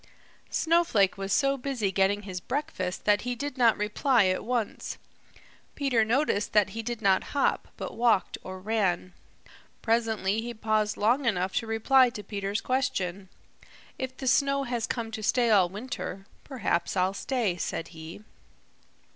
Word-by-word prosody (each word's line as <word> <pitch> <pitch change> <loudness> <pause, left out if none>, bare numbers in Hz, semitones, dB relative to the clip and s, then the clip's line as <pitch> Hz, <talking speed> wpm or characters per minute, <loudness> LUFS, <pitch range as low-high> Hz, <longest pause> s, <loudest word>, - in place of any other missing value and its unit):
Snowflake 325 - +2
was 195 0 -5
so 275 +4 +2
busy 245 -7 -2
getting 195 +2 +1
his 185 -2 -6
breakfast 265 -11 -3
that 205 0 +4
he 245 0 -3
did 285 +2 -4
not 235 -4 +4
reply 215 +2 +2
at 185 - -1
once. 240 -3 -3 0.8
Peter 265 -6 +2
noticed 230 -2 0
that 210 -2 +4
he 225 - -4
did 235 0 -5
not 190 -1 +4
hop, - - +1
but - - -6
walked 230 -5 +2
or 185 0 -7
ran. 185 -3 -1 0.7
Presently 225 -3 +1
he 240 +1 -6
paused 215 -1 0
long 245 +6 +2
enough 185 -4 0
to 230 - -1
reply 250 +4 +4
to 210 -3 -8
Peter's 200 +1 -3
question. 200 -8 -1 0.7
"If 260 -1 -4
the 265 - -6
snow 275 +2 +3
has 240 -3 -2
come 230 -2 -3
to 220 - -5
stay 230 +2 +2
all 190 -4 +5
winter, 200 -2 -6 0.2
perhaps 200 -10 -1
I'll 185 +1 +2
stay," 225 -3 -1
said 165 -1 -3
he. 160 +4 -10
220 Hz, 155 wpm, -28 LUFS, 195-250 Hz, 0.8 s, all